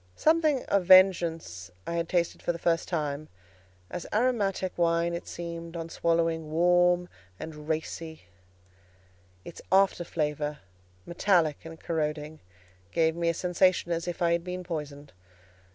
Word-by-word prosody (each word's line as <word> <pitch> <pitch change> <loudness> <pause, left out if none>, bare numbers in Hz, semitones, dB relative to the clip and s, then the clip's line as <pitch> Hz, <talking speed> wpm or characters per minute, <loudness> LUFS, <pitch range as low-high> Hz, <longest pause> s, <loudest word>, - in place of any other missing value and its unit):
Something 310 -4 +2
of 200 -2 +1
vengeance 170 - +4 0.2
I - - -4
had 170 -1 -2
tasted 175 -2 0
for - - 0
the 170 - -6
first 170 0 0
time; 150 -3 -3 0.6
as 175 - -5
aromatic 205 -5 0
wine 170 0 +1
it 170 - -5
seemed, 170 0 -6
on 165 0 -5
swallowing, 165 -2 0
warm 175 +2 +3 0.3
and 155 -1 -8
racy: 160 0 -4 1.2
its 170 - -10
after 190 -2 +4
flavour, 150 -2 -2 0.5
metallic 170 -4 +1
and 165 0 -9
corroding, 150 -1 -3 0.5
gave 160 -1 +2
me 170 0 0
a - - +1
sensation 180 0 +2
as 170 +1 -2
if 175 0 -3
I 170 - +3
had 170 0 +1
been 180 0 -5
poisoned. 150 -4 -6
170 Hz, 135 wpm, -28 LUFS, 160-180 Hz, 1.2 s, vengeance